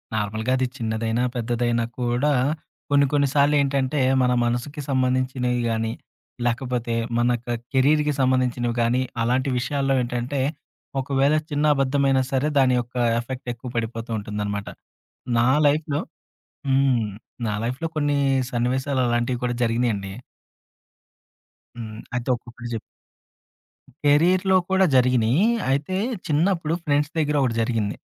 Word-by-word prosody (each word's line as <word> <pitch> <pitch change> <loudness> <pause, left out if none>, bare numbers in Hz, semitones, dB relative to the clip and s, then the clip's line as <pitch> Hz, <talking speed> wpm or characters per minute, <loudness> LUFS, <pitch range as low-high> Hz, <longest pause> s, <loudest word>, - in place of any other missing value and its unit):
నార్మల్‌గా 110 +3 -1
అది 130 - +1
చిన్నదైనా, 115 +1 -1
పెద్దదైనా 120 0 0
కూడా 125 +4 +1 0.6
కొన్ని 140 0 +4
కొన్ని 145 -1 +3
సార్లేంటంటే 140 -1 +2 0.2
మన 125 0 +3
మనసుకి 120 +6 -2
సంబంధించినయి 130 -1 0
గాని, 115 0 -1 0.5
లేకపోతే 120 -1 -1 0.2
మన 120 +1 +2 0.2
క - - -47 0.3
కెరీర్‌కి 150 +3 +3
సంబంధించినవి 125 -2 +1
గాని 120 +2 +2 0.2
అలాంటి 130 +4 +1
విషయాల్లో 135 +2 0
ఏంటంటే 125 +3 -2 0.6
ఒకవేళ 140 +2 +2
చిన్న 145 +1 0
అబద్ధమైన 135 0 +2
సరే 135 +2 +1
దాని 130 -1 +4
యొక్క 120 +1 -7 0.2
ఎఫెక్ట్ 125 +2 -7
ఎక్కువ 120 +2 -9
పడిపోతూ 115 0 -3
ఉంటుందనమాట. 105 -1 -4 0.7
నా 120 +1 +3 0.2
లైఫ్‌లో 150 0 0 0.7
హ్మ్. 135 -4 +2 0.4
నా 105 - -1
లైఫ్‌లో 130 +7 -2
కొన్ని 145 -1 +1 0.3
సన్నివేశాలు 130 +3 0
అలాంటివి 120 +1 0
కూడా 120 0 0
జరిగినాయండి. 115 -4 -1 1.7
హ్మ్. 110 -2 -7 0.2
అయితే 125 +1 -3
ఒక్కొక్కటి 120 0 -10
జెప్ 115 - -2 1.3
కేరియర్‌లో 180 +6 +4
కూడా 190 0 +4
జరిగినయి. 125 - +3 0.3
అయితే 145 +7 -1 0.3
చిన్నప్పుడు 165 +1 +1
ఫ్రెండ్స్ 145 +1 +1
దగ్గర 150 -1 +1
ఒకటి 125 -4 +1
జరిగింది. 110 -3 -1
125 Hz, 115 wpm, -23 LUFS, 120-140 Hz, 1.7 s, కొన్ని